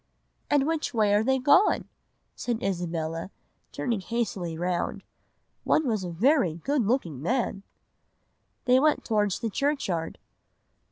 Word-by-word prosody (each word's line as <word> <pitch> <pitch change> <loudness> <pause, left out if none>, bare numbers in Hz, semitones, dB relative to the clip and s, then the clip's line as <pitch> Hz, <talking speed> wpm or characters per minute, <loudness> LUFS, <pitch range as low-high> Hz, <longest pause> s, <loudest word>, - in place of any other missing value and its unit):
"'And 285 -2 +3
which 315 -4 -2
way 210 -2 +3
are 210 +1 +3
they 265 +3 +2
gone?' 285 +10 +4 0.5
said 240 0 -3
Isabella, 165 -2 -2 0.4
turning 230 -5 -2
hastily 190 -7 -3
round. 175 0 -2 0.6
'One 310 - +2
was 215 -5 0
a 180 - -4
very 195 - +2
good 275 - 0
looking 210 - 0
young - - -9
man.' 205 - -1 1.0
"'They 255 +1 +5
went 305 +2 +2
towards 210 -4 +1
the 225 -2 -2
churchyard. 195 - -1
220 Hz, 130 wpm, -27 LUFS, 175-265 Hz, 1.0 s, They